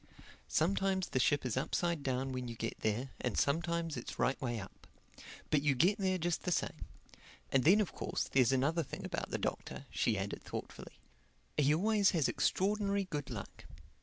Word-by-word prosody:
Sometimes 190 +3 +1
the 130 - 0
ship 140 +2 +2
is 125 - -1
upside 170 +4 0
down 130 -1 -1
when 125 -1 -3
you 120 - -6
get 115 +1 -4
there, 115 +5 -1
and 125 -4 -1
sometimes 165 +2 +1
it's 120 - -6
right 135 - +1
way 120 -3 -1
up. 95 - -11 0.6
But 150 - +4
you 145 -2 +2
get 190 - +3
there 190 -1 +1
just 175 -1 -1
the 180 - -2
same. - - -1 0.7
And 135 -2 +3
then 190 +7 +7
of 210 - 0
course - - -2
there's 130 -3 +3
another 140 +6 +2
thing 140 - -6
about - - -3
the - - -1
Doctor," - - -4
she - - +1
added - - -3
thoughtfully: - - -7 0.6
"he 150 +1 +4
always 205 +3 +3
has 150 - +3
extraordinary 200 +7 +1
good 145 -3 -3
luck. 105 -6 -7
150 Hz, 180 wpm, -34 LUFS, 130-180 Hz, 0.7 s, then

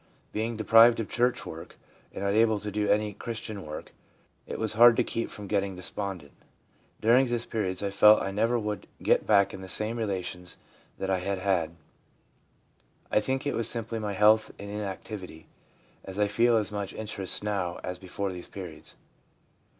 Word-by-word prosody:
Being 110 +1 -2
deprived 115 +2 +6
of 110 - -2
church 125 +1 0
work, 80 +1 -9 0.3
and - - -6
unable 110 +2 +3
to 105 - -5
do 105 +1 -1
any 105 +1 +2
active 105 - -14
Christian 110 -4 -5
work, 75 - -8 0.5
it - - -5
was 110 -1 0
hard 120 +1 +7
to 125 - +4
keep 115 0 -3
from 105 - -8
getting 100 -1 -1
despondent. 90 -4 -5 0.7
During 125 +4 +5
these 120 -1 -1
periods 100 -4 -2
I 100 - -1
felt 105 +2 +7
I 95 - -3
never 115 +4 +1
would 105 -2 -4 0.2
get - - +2
back 100 -2 +4
in 95 - -8
the 95 - -8
same 110 +5 +1
relations 90 -4 -3 0.4
that 95 - -2
I 95 - +1
had 100 +2 -2
had. 90 -4 0 1.4
I - - +4
think 130 +5 -2
it 145 - 0
was 115 -1 0
simply 115 -1 -3
my 105 -2 -3
health 110 +2 +4
and 100 0 -8
inactivity, 100 -4 -6 0.6
as 95 0 -8
I 105 - +3
feel 115 +3 +3
as 105 -1 0
much 100 -2 -4
interest 105 -3 +2
now 95 -4 -2
as 90 0 -5
before 95 +1 -4
these 90 -1 -7
periods.' 90 -5 -5
105 Hz, 180 wpm, -28 LUFS, 95-110 Hz, 1.4 s, hard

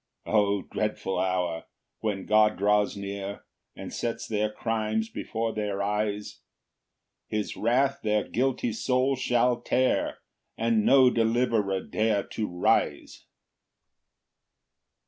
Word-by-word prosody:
6 - - -7
O 100 -1 +3
dreadful 105 -3 -2
hour! 90 -3 -1 0.3
when 100 -3 -2
God 105 0 +4
draws 105 +1 +2
near, 100 0 -6 0.3
And - - -8
sets 115 -1 -3
their 105 -1 0
crimes 110 0 -1
before 115 0 -3
their 100 -2 -2
eyes! 105 0 -2 0.9
His 105 -1 -3
wrath 135 +5 +1
their 105 -1 0
guilty 125 -2 0
souls 130 +3 +1
shall 120 -1 +2
tear, 130 +1 +1 0.4
And 115 -1 +2
no 130 0 +6
deliverer 115 -4 +1
dare 110 -1 0
to 110 - -3
rise. 90 0 0
110 Hz, 110 wpm, -27 LUFS, 100-115 Hz, 0.9 s, no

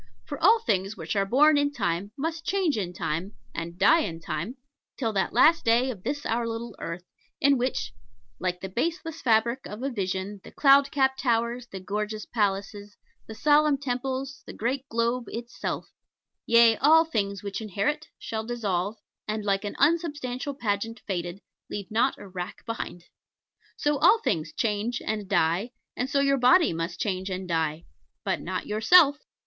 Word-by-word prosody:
For - - -7
all 455 - +7
things 195 - -1
which 165 +1 -4
are 195 -1 +1
born 290 +6 +5
in 285 0 +1
Time 200 -6 -2
must 320 +3 -3
change 345 -2 +1
in 190 -5 -2
Time, 170 +3 -3 0.2
and 170 +1 -5
die 330 - +5
in 165 - -3
Time, 170 - -4 0.4
till 225 -5 -1
that 195 -2 0
Last 330 +2 +5
Day 240 +3 +3
of 205 -7 -9
this 285 +8 -3
our 230 +1 0
little 230 -1 -5
earth, 165 +2 -5 0.4
in 280 0 +4
which, 250 0 -2 0.5
"Like 180 -1 -2
to 190 - -4
the 185 - -15
baseless 325 - -2
fabric 235 +2 +2
of 210 +5 -7
a 275 - -1
vision, 195 -1 -3
The - - -12
cloud 275 -1 +5
capped 265 -2 +1
towers, 235 0 0
the 195 - -7
gorgeous 210 +2 -3
palaces, 205 -1 -2 0.3
The 220 - -8
solemn 295 +3 +4
temples, 265 0 -3
the - - -7
great 260 +4 -2
globe 235 +2 0
itself, 235 +1 -5 0.6
Yea, 235 -1 +6
all 320 +4 +6
things 200 - -2
which 200 +1 -4
inherit, 220 - -2
shall 220 -1 -4
dissolve, 210 -4 -2 0.3
And, 215 0 -3
like 195 0 +1
an 205 - -4
unsubstantial 290 -5 0
pageant 225 -1 -2
faded, 175 0 -4 0.3
Leave 205 +1 -6
not 240 +5 +2
a 200 - -11
rack 180 -1 -7
behind." 225 -6 -5 0.7
So 295 -1 +1
all 355 +8 +6
things 155 - -1
change 225 +2 -1
and 210 -2 -3
die, 180 +5 +1 0.2
and 250 +1 -2
so 280 -1 +2
your 275 -1 +2
body 320 +8 +5
too 165 - -4
must 165 +1 -4
change 190 -1 -2
and 185 0 -4
die 160 -1 -1 0.4
but - - -1
not - - -4
yourself. 285 +8 +5
225 Hz, 175 wpm, -26 LUFS, 195-275 Hz, 0.7 s, all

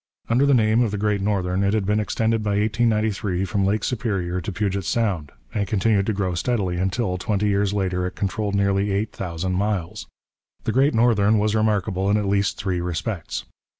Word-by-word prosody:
Under 130 +4 +4
the 140 - +5
name 110 0 +3
of 120 - +2
the 105 - -3
Great 105 -1 0
Northern 95 -2 0
it 100 +2 +2
had 105 -3 0
been 105 +2 +1
extended 110 +2 0
by 105 -1 0
1893 105 -3 0
from 100 +1 0
Lake 105 +2 0
Superior 95 -7 -1
to 90 - -4
Puget 100 0 -1
Sound, 95 -9 -1 0.2
and 100 -1 -1
continued 100 -1 +1
to 110 - +1
grow 95 -2 -1
steadily 95 -2 -1
until, 95 0 -1
twenty 105 +2 0
years 100 0 +1
later, 90 -3 -1
it 90 - -8
controlled 100 +1 -2
nearly 100 0 +1
eight 100 +2 -1
thousand 90 0 -3
miles. 95 -3 -2 0.6
The - - -1
Great 135 +2 +3
Northern 110 -2 +4
was 105 0 +1
remarkable 105 -3 +1
in 105 - +3
at 105 - -1
least 100 0 +1
three 95 -3 -2
respects. 90 +2 -3
100 Hz, 190 wpm, -23 LUFS, 95-110 Hz, 0.6 s, the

